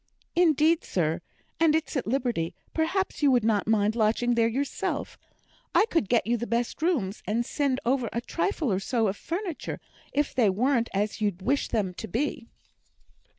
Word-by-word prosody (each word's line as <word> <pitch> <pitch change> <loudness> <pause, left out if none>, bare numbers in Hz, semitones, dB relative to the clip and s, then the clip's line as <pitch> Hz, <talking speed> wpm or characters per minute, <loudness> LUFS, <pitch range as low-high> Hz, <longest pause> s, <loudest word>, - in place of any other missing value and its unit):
"Indeed, 330 -1 +4
sir, 165 -1 -1 0.4
and 320 -2 +4
it's 320 0 -1
at 265 - -1
liberty; 235 -10 -1 0.2
perhaps 330 +4 -1
you 290 - +5
would 250 -4 +3
not 215 -2 +1
mind 215 0 +2
lodging 230 +2 +2
there 230 -1 +3
yourself; 265 +5 -2 0.6
I - - +6
could 330 - +1
get 235 -2 +3
you 240 +1 +1
the 240 +1 -4
best 235 +5 -1
rooms, 255 - 0
and 230 +3 0
send 275 -1 0
over 250 -1 +1
a 235 - -1
trifle 320 - -1
or 185 - +1
so 225 +1 +1
of 190 - -3
furniture, 345 - -4 0.3
if 290 0 0
they 240 -6 +4
wern't 235 +4 +1
as 210 +3 -1
you'd 200 -3 -1
wish 280 +7 +1
them 195 -5 -1
to 220 - -7
be." 245 - -2
240 Hz, 175 wpm, -27 LUFS, 215-290 Hz, 0.6 s, I